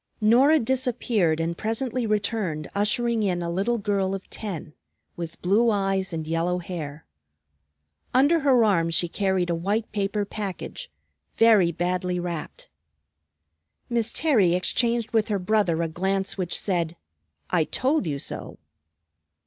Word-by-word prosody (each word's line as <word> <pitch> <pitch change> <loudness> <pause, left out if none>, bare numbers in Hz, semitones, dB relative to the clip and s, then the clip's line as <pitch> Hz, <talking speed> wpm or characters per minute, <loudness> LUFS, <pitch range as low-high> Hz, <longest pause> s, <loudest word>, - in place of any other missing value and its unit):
Norah 250 +8 +5
disappeared 235 - 0
and 165 +1 -1
presently 230 +4 -1
returned 205 -7 -1
ushering 225 +3 +1
in 180 -4 0
a 170 - -3
little 200 +7 0
girl 195 -2 0
of 195 - -8
ten, 180 -8 -6 0.4
with 170 -1 -7
blue 210 +6 +3
eyes 195 -2 0
and 160 -2 -4
yellow 165 +3 0
hair. 165 -4 -6 1.1
Under 285 +6 +4
her 265 -5 +4
arm 170 -6 +2
she 165 +1 +1
carried 190 -1 0
a - - +1
white 200 +7 -1
paper 205 0 -1
package, 200 - -5 0.5
very 215 -7 +5
badly 180 +1 -1
wrapped. 170 -3 -6 1.2
Miss 235 -1 +2
Terry 215 - +3
exchanged 235 +5 +1
with 220 -2 +2
her 210 -3 0
brother 180 -4 +1
a - - 0
glance 190 +4 -1
which 180 -3 -2
said, 170 -4 -1 0.6
"I 170 -3 +3
told 260 - 0
you 145 -2 -2
so!" - - -5
195 Hz, 135 wpm, -25 LUFS, 175-225 Hz, 1.2 s, Norah